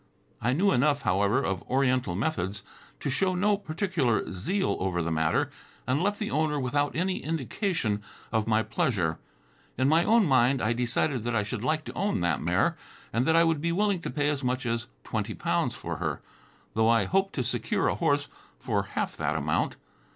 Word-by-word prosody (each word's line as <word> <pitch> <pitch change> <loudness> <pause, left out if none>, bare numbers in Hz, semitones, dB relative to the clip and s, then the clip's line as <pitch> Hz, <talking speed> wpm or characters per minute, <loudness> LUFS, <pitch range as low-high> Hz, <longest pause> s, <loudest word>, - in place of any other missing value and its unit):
I 120 +3 +1
knew 195 +8 +3
enough, 140 +1 +2
however, 100 +7 +2
of 95 -6 -1
oriental 125 -7 +1
methods, 105 - -2 0.4
to 140 - -1
show 185 +6 +1
no 205 +3 +3
particular 160 - -1
zeal 185 - -1
over 95 -2 -1
the 85 - -2
matter, 80 -1 +1 0.3
and 130 +5 +1
left 205 +2 +1
the 210 0 -3
owner 150 0 +1
without 145 +2 0
any 185 +3 0
indication 155 - -1 0.3
of 110 -1 0
my 110 0 +3
pleasure. 100 - 0 0.6
In 130 - +2
my 160 +3 +4
own 225 +1 +4
mind, 130 -2 +4
I 110 +1 +1
decided 120 +1 0
that 120 -1 -1
I 105 - +2
should 105 +1 -4
like 155 +3 0
to - - -7
own 200 - 0
that 85 -6 +1
mare, - - +2 0.4
and 120 +4 +1
that 160 - +4
I 165 - +6
would 165 -3 +1
be 170 +1 0
willing 200 +1 +1
to - - -4
pay 145 -1 0
as 145 -2 -2
much 125 0 -1
as 115 -1 -1 0.2
twenty - - -3
pounds - - 0
for - - -5
her, - - -3 0.5
though 110 +1 +3
I 115 -1 +4
hoped 195 +1 +1
to 130 - -1
secure 115 - 0
a - - +2
horse - - +1 0.3
for - - 0
half - - -3
that 75 0 -1
amount. 75 -1 0
130 Hz, 195 wpm, -28 LUFS, 110-165 Hz, 0.6 s, I